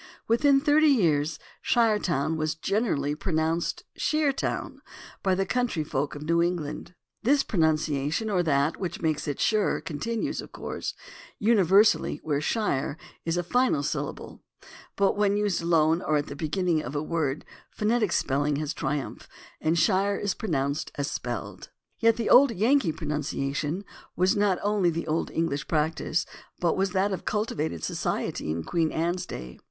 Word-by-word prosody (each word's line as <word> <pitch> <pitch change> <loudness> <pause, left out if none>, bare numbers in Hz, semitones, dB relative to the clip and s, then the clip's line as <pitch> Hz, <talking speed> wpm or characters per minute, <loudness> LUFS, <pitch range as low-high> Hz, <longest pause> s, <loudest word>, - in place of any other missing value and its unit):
Within 275 +5 +4
thirty 300 +2 +4
years 160 - +2 0.3
"Shiretown" 205 - +2
was 155 -1 -1
generally 160 - 0
pronounced 165 - -1
"Sheer 305 -2 +1
town" - - -3 0.4
by 190 -1 +2
the 195 +1 0
country 245 -7 0
folk 140 0 -2
of 145 - -7
New 170 +2 +2
England. 170 0 -3 0.3
This 275 +5 +3
pronunciation 155 +1 0
or 195 -4 +2
that 145 -2 +1
which 180 -3 -4
makes 155 -2 0
it 145 - -3
"sher" 215 -2 +2
continues, 225 +9 -3
of - - -12
course, - - -5 0.4
univer 205 -2 +5
sally - - +1
where 145 -2 0
"shire" 155 -7 -1 0.3
is 165 +1 0
a 175 - 0
final 245 - +2
syllable, - - -4 0.5
but 200 0 +2
when 205 -1 +2
used 205 -4 0
alone 165 0 +3
or 155 -4 +1
at 145 - -1
the 140 - -8
beginning 165 +2 0
of 130 +2 -6
a 145 - -1
word 155 -4 -2 0.2
phonetic 215 -2 0
spelling 145 -2 +1
has 150 +1 -2
triumphed, 145 -2 -4 0.3
and 160 +2 +1
shire 195 +4 +2
is 205 -2 -1
pronounced 140 -7 -2
as 140 0 -2
spelled. - - -5 0.3
Yet 230 -1 +4
the 230 -2 -2
old 275 +2 +7
Yankee 230 - +2
pronunciation 150 +3 -3 0.3
was 185 +1 +3
not 205 -3 +2
only 205 -3 +2
the 165 0 -3
old 160 +1 -1
EngHsh 150 -3 -1
practice, 160 +1 0 0.3
but 170 -2 +1
was 195 +1 +1
that 195 +1 +2
of 190 - -3
culti 215 +1 -1
vated 145 - -3
society - - -2
in 80 +1 -2
Queen 165 - 0
Anne's 175 +3 -1
day. 60 0 -8
170 Hz, 160 wpm, -27 LUFS, 150-205 Hz, 0.5 s, old